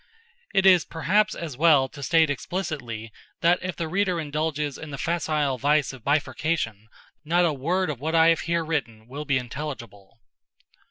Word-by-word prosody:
It 195 - +2
is 180 -4 +7
perhaps 200 +7 +1
as 160 -6 -6
well 150 -2 +4
to 145 - -11
state 160 0 +3
explicitly 125 - -4 0.3
that 175 +2 +4
if 185 -1 -4
the 165 - -3
reader 180 0 0
indulges 150 -1 -2
in 155 - -8
the 140 - -6
facile 150 -3 -1
vice 145 +1 +2
of 130 -4 -12
bifurcation 145 -6 -1 0.4
not 175 +3 +2
a 160 - +1
word 170 +5 0
of 135 - -7
what 160 +4 -2
I 165 0 +6
have 165 -1 +3
here 170 -1 +1
written 115 -9 -3
will 145 +4 -6
be 140 -2 +2
intelligible. 120 -6 -7
150 Hz, 170 wpm, -25 LUFS, 135-170 Hz, 0.4 s, is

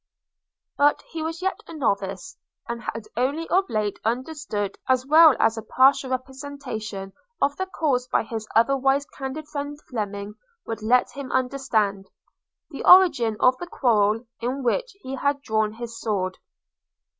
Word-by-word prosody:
But 290 +1 +3
he 325 - -4
was 330 +3 -4
yet 380 - -1
a 330 - -9
novice; 240 - -2 0.3
and 235 -1 -4
had 230 -1 -5
only 280 +7 -1
of 385 +1 +2
late 210 -2 -1
understood, 240 -4 -3
as 255 0 +3
well 310 0 +7
as 225 0 +2
a - - -6
partial 260 +4 +3
representation 255 -7 -5 0.3
of 285 +1 +1
the 375 - -2
cause 270 -9 0
by - - +1
his 220 -1 -6
otherwise 270 +4 +3
candid 290 +2 -7
friend 290 -1 -5
Fleming 205 -3 -4 0.3
would 225 -1 -5
let 245 +3 +3
him 275 -2 -7
understand, 235 -7 0 0.6
the 280 - -6
origin 285 - +6
of 255 0 +5
the 350 - -6
quarrel 225 -6 +2
in 255 +4 -3
which - - 0
he 260 - -6
had 285 +1 0
drawn 215 -2 0
his 230 0 -8
sword. 185 -4 -2
255 Hz, 150 wpm, -24 LUFS, 220-285 Hz, 0.6 s, well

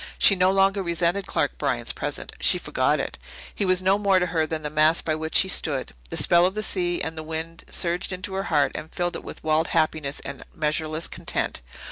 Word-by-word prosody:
She 200 - +6
no 185 0 +3
longer 195 +1 +3
resented 170 +2 0
Clark - - -1
Bryant's - - -1
presence - - -5
she - - +6
forgot - - 0
it. - - -4 0.3
He 205 - -1
was 185 0 +3
no 195 +2 +3
more 200 -2 +3
to 180 - +2
her 160 -3 0
than 155 -1 -4
the 150 - -4
mast 155 +2 +3
by 155 - +1
which 160 +1 +2
he 190 - -2
stood. 145 -7 +1 0.2
The - - -4
spell 175 +1 +5
of 190 - -5
the 215 - -2
sea 175 -4 -1
and 160 0 -4
the 160 - -5
wind 160 +1 -6
surged 175 +2 0
into 185 +1 -5
her 195 +1 -2
heart 145 -3 +3
and 160 - -7
filled 175 -1 -2
it - - -6
with - - -9
wild 155 +1 +2
happiness 155 -3 0
and - - -7
measureless 155 +1 -1
content. - - -3
170 Hz, 220 wpm, -24 LUFS, 155-185 Hz, 0.3 s, She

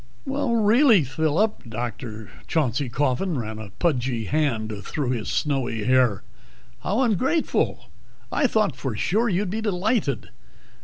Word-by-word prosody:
"Really, 235 - +4
Phillip!" 155 - 0
Dr. 110 -2 -5 0.2
Chauncey 140 -4 0
Coffin 145 +6 0
ran 110 -2 -4
a 110 -2 -8
pudgy 125 - -1
hand 120 -5 0
through 135 +3 -2
his 115 -4 -2
snowy 130 -7 -1
hair. 125 -3 +3 0.6
"How 210 +7 0
ungrateful! 260 - +1 0.5
I 280 - +2
thought 215 - +1
for 130 -4 -4
sure 220 - +1
you'd 190 0 0
be 220 +2 -2
delighted. 200 - 0
145 Hz, 120 wpm, -24 LUFS, -, 0.6 s, Really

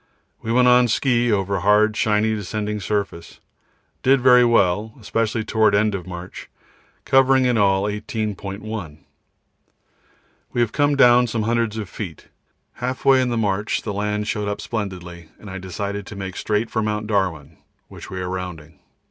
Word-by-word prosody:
We 115 - -3
went 125 +1 +4
on 125 0 +5
ski 120 0 +1
over 100 -1 0
hard 105 +3 +3
shiny 110 0 +1
descending 105 +1 -3
surface. 100 -3 -4 0.6
Did 135 +1 +4
very 125 -1 +6
well, 110 -2 +2
especially 110 0 -1
towards 110 -2 +2
end 105 0 +1
of 95 -2 -5
march, 90 0 -8 0.6
covering 135 0 +4
in 125 -1 +2
all 95 -2 +3
18.1. 105 -4 -5 1.5
We - - -3
have 115 -2 +1
come 145 0 +2
down 125 -2 +5
some 115 -1 -2
hundreds 115 -1 0
of 105 -3 -4
feet. 90 -5 -8 0.5
Half 125 +1 -4
way 135 -1 +6
in 125 - 0
the 120 - -1
march 105 -1 -1
the 105 - -4
land 105 +1 -2
showed 105 -1 -2
up 105 - -3
splendidly, 90 -6 -6
and 105 - -10
I 95 - -6
decided 100 +2 -5
to - - -9
make 95 -2 -6
straight 110 +1 -1
for 110 - 0
Mt. 105 0 -2
Darwin, 90 -8 -2 0.3
which - - -11
we 95 - -5
are 90 - -3
rounding. 85 -5 -7
105 Hz, 165 wpm, -21 LUFS, 95-115 Hz, 1.5 s, very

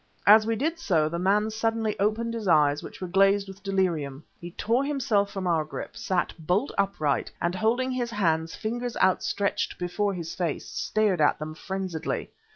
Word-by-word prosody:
As 215 +1 +7
we 225 - +1
did 320 +8 -1
so, 165 - +2
the 170 +2 -3
man 205 +4 +2
suddenly 225 0 -1
opened 220 +3 0
his 225 -3 -4
eyes, 150 -3 +4
which - - -10
were 185 - -3
glazed 195 +2 +3
with 195 +1 -11
delirium. 170 -8 -1 0.2
He 175 - -7
tore 230 +8 0
himself 240 -8 +1
from 195 -2 -5
our 165 -3 +2
grip, 155 - -7
sat 185 -2 -1
bolt 180 - 0
upright, 195 -8 0
and 170 +1 0
holding 235 +6 +1
his 245 -2 -2
hands, 165 -7 0
fingers 240 +2 -3
outstretched, 200 +2 +1
before 195 +3 -1
his 165 -2 -5
face, 170 -5 -2
stared 210 -6 0
at 145 - +4
them 155 0 -6
frenziedly. 185 -1 -4
195 Hz, 175 wpm, -26 LUFS, 170-220 Hz, 0.2 s, As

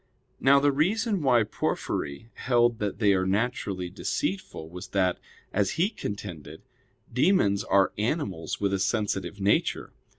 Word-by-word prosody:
Now 140 +1 +6
the 145 +1 +3
reason 200 - +1
why 125 -5 +4
Porphyry 105 -2 -3
held 120 -2 +2
that 105 -2 -2
they 105 -2 +4
are 95 -1 +1
naturally 100 -3 -1
deceitful 95 -4 -3
was 90 +2 -8
that, 90 -2 +2 0.3
as 100 -1 +1
he 185 +6 +1
contended, 90 - -7 0.5
demons 125 - +3
are 100 0 +3
animals 105 - -2
with 100 -1 0
a 95 - +1
sensitive 95 -2 -1
nature. 100 +1 +1
105 Hz, 135 wpm, -27 LUFS, 95-125 Hz, 0.5 s, Now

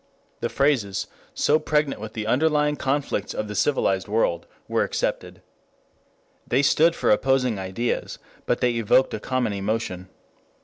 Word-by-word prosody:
The 120 - -2
phrases, 115 -6 +1 0.3
so 155 +1 +3
pregnant 150 -7 0
with 110 0 -7
the 110 -2 -4
underlying 150 +4 +2
conflicts 135 -7 -2
of 105 - -3
the 105 - -5
civilized 95 -5 +1
world, 100 -5 0 0.2
were - - +1
accepted. - - -3 1.0
They 130 +3 +2
stood 165 +4 +4
for - - +1
opposing 125 -1 +2
ideas, 95 +6 -3 0.3
but - - 0
they 125 - +3
evoked 115 +4 +3
a - - -3
common 130 -2 -1
emotion. 100 -2 -3
120 Hz, 140 wpm, -24 LUFS, 105-140 Hz, 1.0 s, stood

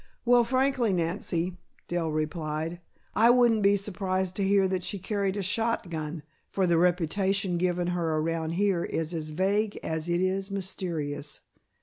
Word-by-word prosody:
"Well, 240 0 +6
frankly, 255 -2 +1
Nancy," 175 0 -1 0.3
Dell 175 -2 -1
replied, 155 +1 -2 0.3
"I 230 +2 +5
wouldn't 240 -3 +5
be 200 0 +5
surprised 190 -2 -2
to 200 - +1
hear 195 0 +4
that 185 -1 -2
she 200 - -2
carried 200 0 -1
a 200 - -1
shotgun, 175 -7 -1 0.3
for 190 - +1
the 170 -2 +3
reputation 180 +2 +1
given 175 0 0
her 170 -3 0
around 165 +1 -1
here 190 -1 +1
is 165 +1 -2
as 155 -2 -4
vague 200 +6 0
as 160 +1 -3
it 175 0 +2
is 190 +1 0
mysterious. 170 -7 -4
185 Hz, 150 wpm, -28 LUFS, 165-200 Hz, 0.3 s, Well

